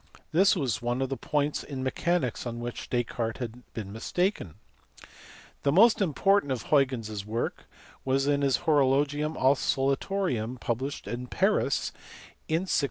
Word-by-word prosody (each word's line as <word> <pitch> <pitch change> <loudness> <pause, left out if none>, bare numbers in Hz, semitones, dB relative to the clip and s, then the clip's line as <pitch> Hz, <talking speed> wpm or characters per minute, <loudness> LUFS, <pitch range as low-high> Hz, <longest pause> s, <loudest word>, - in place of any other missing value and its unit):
This 190 +6 +5
was 135 - -1
one 120 +1 -1
of 135 - -2
the 135 - -1
points 145 +1 -1
in 135 -3 -5
mechanics 130 -2 -1
on 120 0 -5
which 120 0 -6
Descartes 115 -2 -1
had 120 0 -7
been 105 -3 -5
mistaken. 175 - -1 1.1
The 140 - +2
most 220 +7 +6
important 195 -2 +2
of 125 -4 -2
Huygens 130 -7 +1
s 105 -2 -4
work 110 +3 -3 0.4
was 135 +1 +1
his 140 -1 +2
Horolo 145 -3 +4
gium 150 +2 -3
Oscillatorium 135 - +1
published 130 +5 -3
at 125 +1 -5
Paris - - +1 0.6
in 160 +3 +1
1673. 190 - -5
135 Hz, 145 wpm, -28 LUFS, 120-150 Hz, 1.1 s, most